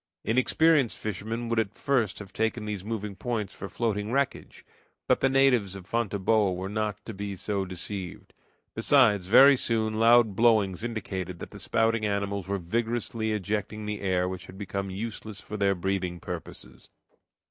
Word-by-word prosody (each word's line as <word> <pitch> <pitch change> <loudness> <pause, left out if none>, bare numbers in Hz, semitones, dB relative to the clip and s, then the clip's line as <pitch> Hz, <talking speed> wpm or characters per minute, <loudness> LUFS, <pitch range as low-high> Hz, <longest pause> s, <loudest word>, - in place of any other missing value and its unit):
Inexperienced 130 +3 +3
fishermen 110 +3 -4
would 115 -1 +1
at 110 -2 -2
first 120 -8 0
have 100 -2 -10
taken 110 0 -1
these 105 -3 -4
moving 105 -2 -4
points 110 0 -3
for 95 - -7
floating 110 -2 -2
wreckage, 140 +1 -2 0.4
but - - +3
the 135 - +3
natives 130 -8 +3
of 95 -2 -9
Fonteboa 105 -2 +1
were 95 +1 -4
not 105 -1 -3
to 110 - -6
be 100 0 -5
so 100 +1 -2
deceived. 95 0 -6 0.4
Besides, 110 -6 +4
very 135 +7 +8
soon 110 -3 -1
loud 115 -2 +5
blowings 110 -4 +3
indicated 95 -6 -4
that - - -9
the - - -10
spouting 115 0 +1
animals 100 -2 -1
were 100 0 -1
vigorously 110 +3 -2
ejecting 105 +1 -3
the 105 -1 -4
air 90 -2 +1
which 95 0 -6
had 95 - -11
become 100 -1 -4
useless 110 +1 -6
for 105 - -8
their 100 -1 +2
breathing 90 -1 -2
purposes. - - -8
105 Hz, 160 wpm, -27 LUFS, 95-115 Hz, 0.4 s, very